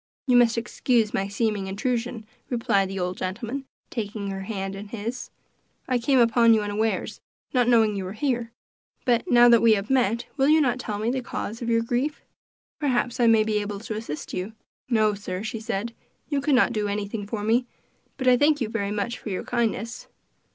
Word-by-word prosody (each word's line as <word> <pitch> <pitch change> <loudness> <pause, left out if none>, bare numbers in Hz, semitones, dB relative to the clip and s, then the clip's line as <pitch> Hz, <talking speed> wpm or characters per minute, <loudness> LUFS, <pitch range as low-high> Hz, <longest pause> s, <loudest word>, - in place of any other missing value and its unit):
"You 250 - +3
must 240 -1 +5
excuse 230 -1 +1
my 195 - 0
seeming 200 -1 -1
intrusion," 235 +2 -2 0.2
replied 200 -5 +1
the 195 0 -4
old 180 0 -2
gentleman, 230 +8 -4 0.3
taking 210 -3 -4
her 195 0 -5
hand 195 -2 -4
in 200 +2 -8
his. 230 +3 -5 0.6
"I 255 -2 +1
came 265 +3 +2
upon 230 -1 +5
you 215 - +1
unawares, 210 +2 -2 0.3
not 250 -2 +3
knowing 225 -3 +4
you 195 -1 -3
were 185 - -5
here; 240 -1 -1 0.5
but 240 -3 +1
now 240 0 +7
that 235 -1 +6
we 230 -1 +6
have 205 +3 -2
met, 235 -3 +2
will 270 0 +3
you 315 +1 +6
not 255 -4 +1
tell 215 -4 -4
me 220 +3 0
the 260 0 -1
cause 230 -1 -5
of 235 - -2
your 230 0 +2
grief? 255 +6 -2 0.6
Perhaps 250 -5 0
I 240 - +4
may 225 -1 +5
be 215 -1 0
able 205 -1 -4
to 220 -1 -5
assist 215 -9 -6
you." 190 +4 -4 0.4
"No, 215 -3 +3
sir," 195 -1 -5
she 225 0 -4
said, 230 0 -3 0.4
"you 285 -2 0
could 280 0 +2
not 240 - +4
do 210 -2 -1
anything 205 0 -3
for 210 -1 -4
me; 235 +3 +2 0.5
but 260 - -2
I 250 -1 +6
thank 290 +2 +3
you 230 -5 -2
very 205 -3 -2
much 210 +3 -2
for - - -7
your 185 - -3
kindness." 230 -1 -2
230 Hz, 200 wpm, -25 LUFS, 205-245 Hz, 0.6 s, now